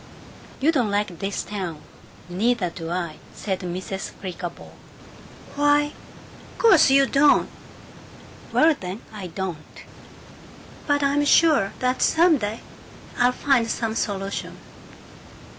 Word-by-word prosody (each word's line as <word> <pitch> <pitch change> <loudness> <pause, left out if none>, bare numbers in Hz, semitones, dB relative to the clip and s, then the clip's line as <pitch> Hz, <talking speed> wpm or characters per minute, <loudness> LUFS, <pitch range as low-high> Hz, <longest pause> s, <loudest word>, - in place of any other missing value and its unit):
You 295 +4 +3
don't 250 -9 +1
like 205 -4 -2
this 195 0 -3
town. 185 -7 -6 0.4
Neither 195 0 0
do 165 0 -7
I," 170 -3 -3 0.2
said 190 -3 -3
Mrs. 185 +1 -5
Flickerbaugh. 180 -2 -8 0.8
"Why 290 +1 +2 0.3
" - - -19
"Course 380 - +6
you 275 0 +5
don't!" 285 +2 +4 1.0
"Well 320 0 +4
then, 185 +4 -7
I 200 -4 -6
don't! 175 -3 -7 1.0
But 290 -1 +2
I'm 280 +1 +2
sure 290 -9 +4
that 255 0 -1
some 330 -2 +4
day 210 +1 -4 0.6
I'll 245 0 +4
find 250 -3 +1
some 225 0 -2
solution. 200 -3 -3
215 Hz, 115 wpm, -23 LUFS, 185-285 Hz, 1.0 s, Course